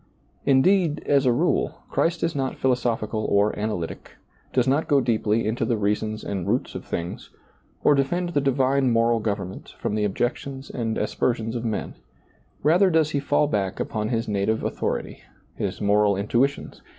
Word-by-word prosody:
Indeed, 155 +3 +3
as 140 -2 +3
a - - +5
rule, 120 - 0
Christ 170 0 0
is 165 0 +1
not 135 -2 -2
philosophical 115 -4 0
or 100 +1 +2
analytic, 105 -6 -4 0.4
does 125 -1 +2
not 140 +5 +2
go 145 -4 +4
deeply 115 -3 +1
into 115 +2 -1
the 115 0 +1
reasons 105 +1 -1
and 95 -4 -3
roots - - 0
of - - -6
things, 85 +1 -5 0.5
or - - +6
defend 175 +6 0
the 145 -4 +1
divine 135 0 +2
moral 115 0 +3
government 100 -3 -4
from - - -2
the 105 0 0
objections 130 +6 -2
and 115 -3 -2
aspersions 115 +1 -1
of 120 0 -3
men; 110 -2 -2 0.7
rather 175 +6 +5
does 160 -3 +2
He 145 - 0
fall 145 +1 +2
back 100 -8 -1
upon 110 -1 -2
His 115 -2 -1
native 105 +2 0
authority, - - -3 0.3
His - - -4
moral 100 -1 +3
intuitions. 120 +8 -1
120 Hz, 165 wpm, -24 LUFS, 105-140 Hz, 0.7 s, or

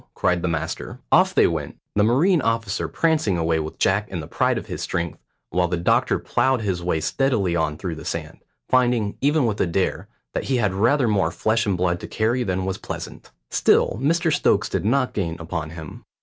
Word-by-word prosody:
cried 90 -2 +1
the 90 - -1
master. 80 -1 -3
Off - - +4
they - - +6
went, - - -2 0.2
the 105 - +2
marine 150 - +3
officer 115 -4 -1
prancing 155 - +1
away 80 -1 +1
with 80 0 -5
Jack 100 +2 +1
in 90 - -4
the 80 - -6
pride - - 0
of - - -5
his - - -6
strength, 85 -2 -3 0.3
while 90 +1 +2
the 90 0 -1
doctor 85 - +2
ploughed 130 -2 +1
his 95 -4 -2
way 85 -2 0
steadily 100 - 0
on 80 -2 0
through 90 -1 -4
the 80 - -8
sand, - - -5 0.3
finding, 120 -5 +2
even 145 0 +3
with 110 -2 -1
Adair, 90 +2 0 0.3
that - - -2
he 130 - +1
had 105 -5 +1
rather 120 +7 +2
more 100 -6 +2
flesh 110 +6 0
and 95 -3 +1
blood 90 -1 0
to - - -7
carry 115 +3 0
than 95 -5 -1
was 95 0 -3
pleasant. - - -7 0.2
Still 105 - +3
Mr 165 +2 +2
Stokes - - +2
did - - -2
not 130 +3 +1
gain 85 -5 -2
upon 80 -1 -4
him. 80 -2 -9
100 Hz, 205 wpm, -23 LUFS, 85-120 Hz, 0.3 s, they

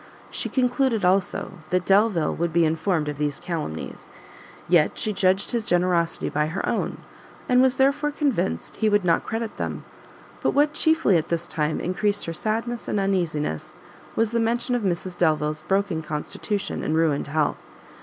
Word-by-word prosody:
She - - -3
concluded, 250 -4 +1
also, 185 0 0
that 180 0 +1
Delvile 195 -5 +3
would 170 0 -1
be 170 +1 +3
informed 160 0 0
of 150 -1 -4
these 145 -2 -1
calumnies, 155 - -5 0.6
yet 170 -3 +3
she 215 - -1
judged 190 0 +2
his 235 -3 -1
generosity 175 -1 +1
by 150 +1 0
her 180 +5 -3
own, - - -1 0.5
and 250 -2 +5
was 260 0 +3
therefore 280 +2 +2
convinced 275 - -1
he 220 - +2
would 205 -2 +2
not 165 -1 +2
credit 225 0 -3
them: - - -4 0.6
but - - +1
what 295 +1 +3
chiefly 315 - +3
at 160 - -2
this 170 0 -1
time 155 -2 -1
encreased 205 +3 0
her 165 - -4
sadness 225 +6 -2
and 210 - 0
uneasiness, 170 - -1 0.4
was 225 -1 +1
the 235 - +1
mention 240 +2 0
of 245 - +1
Mrs 185 -2 -2
Delvile's 155 -2 +1
broken 195 -4 +1
constitution 160 +6 -3
and 155 - 0
ruined 160 -3 +1
health. 150 +1 0
185 Hz, 165 wpm, -24 LUFS, 160-225 Hz, 0.6 s, and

